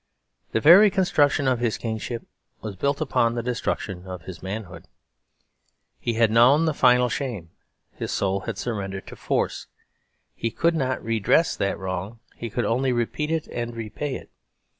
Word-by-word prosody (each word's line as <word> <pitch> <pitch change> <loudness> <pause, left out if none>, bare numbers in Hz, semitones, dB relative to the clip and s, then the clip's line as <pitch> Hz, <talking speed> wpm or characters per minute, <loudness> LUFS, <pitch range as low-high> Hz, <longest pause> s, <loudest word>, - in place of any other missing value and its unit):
The - - +1
very 180 - +8
construction 155 -7 +2
of 130 -2 +2
his 120 -2 0
kingship 115 +1 -4 0.4
was 105 -3 -6
built 140 - -1
upon 120 -5 +1
the 120 - -2
destruction 100 -6 -3
of 90 -3 -7
his 95 -3 -9
manhood. 100 0 -6 1.1
He 120 - -1
had 115 -1 +3
known 130 +8 +5
the 160 - +1
final 125 -2 +4
shame; 115 -9 -4 0.4
his - - -5
soul 95 0 0
had - - -5
surrendered 95 -5 -4
to - - -10
force. - - -2 0.7
He 115 - -2
could 165 +8 +1
not 130 -5 -1
redress 115 +9 +2
that 100 0 -1
wrong; 95 +4 -5 0.2
he 115 - -6
could 120 +1 -1
only 125 +5 +1
repeat 125 +5 -1
it 160 -1 -1
and 120 -1 -4
repay 115 +5 -4
it. - - -10
115 Hz, 160 wpm, -24 LUFS, 105-135 Hz, 1.1 s, very